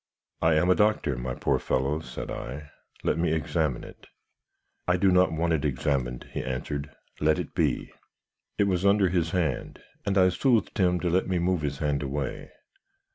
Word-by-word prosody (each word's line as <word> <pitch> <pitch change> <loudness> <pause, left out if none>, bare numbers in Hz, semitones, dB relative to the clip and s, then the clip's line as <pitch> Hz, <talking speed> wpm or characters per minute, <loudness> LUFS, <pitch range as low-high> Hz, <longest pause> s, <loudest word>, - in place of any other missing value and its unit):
"'I 80 0 +4
am 90 +4 +3
a - - +8
doctor, 105 -9 +2
my 60 0 -4
poor - - +1
fellow,' 70 +4 0
said 80 - -7
I. 75 +4 -6 0.3
'Let - - +1
me 85 -2 +1
examine 75 -4 -1
it.' - - -13 0.8
"'I 90 0 +3
do 95 +1 +4
not 90 0 +4
want 85 +1 0
it 75 -4 0
examined,' 65 -3 -1
he - - -3
answered; 70 +2 -4 0.3
'let 75 0 +3
it - - -5
be.' - - 0 0.7
"It - - +4
was 95 -2 0
under 100 -1 +4
his 85 -2 +1
hand, 80 -9 -2 0.2
and 100 -1 0
I 95 -1 +6
soothed 115 +2 +1
him 90 -1 +3
to 90 - 0
let 95 +2 +2
me 95 -1 0
move 90 -1 +1
his 70 -2 -2
hand 75 -1 0
away. 70 -1 -4
80 Hz, 185 wpm, -27 LUFS, 70-90 Hz, 0.8 s, a